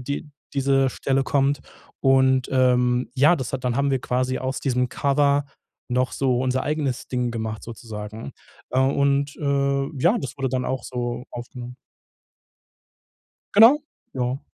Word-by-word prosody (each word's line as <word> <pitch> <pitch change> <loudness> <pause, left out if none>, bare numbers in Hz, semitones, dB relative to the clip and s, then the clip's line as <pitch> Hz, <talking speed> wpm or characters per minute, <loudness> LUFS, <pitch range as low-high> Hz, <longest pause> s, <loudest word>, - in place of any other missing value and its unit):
die 140 +4 -5 0.2
diese 135 -1 +2
Stelle 135 +1 0
kommt. 140 0 +1 0.4
Und, 130 -1 +3
ähm, 125 -1 +2
ja, 150 +6 +5
das 130 -5 -5
hat 130 -1 -4
dann 125 - 0
haben 140 0 +1
wir 135 - +1
quasi 130 +1 -1
aus 130 +1 -3
diesem 125 -2 0
Cover 140 +1 +2 0.4
noch 125 +1 0
so 130 -3 +1
unser 130 0 0
eigenes 145 -4 -2
Ding 125 -1 -1
gemacht 110 -2 -4
sozusagen. 110 -1 -8 0.4
Äh, 130 - 0
und, 140 +1 +1
äh, 140 -1 0
ja, 175 - +3
das 135 - -6
wurde 135 -1 0
dann 125 0 -1
auch 130 -1 -3
so 120 -1 -4
aufgenommen. 120 0 -8 1.8
Genau, 235 +8 +7 0.3
ja. 130 +1 -2
130 Hz, 145 wpm, -23 LUFS, 125-140 Hz, 1.8 s, Genau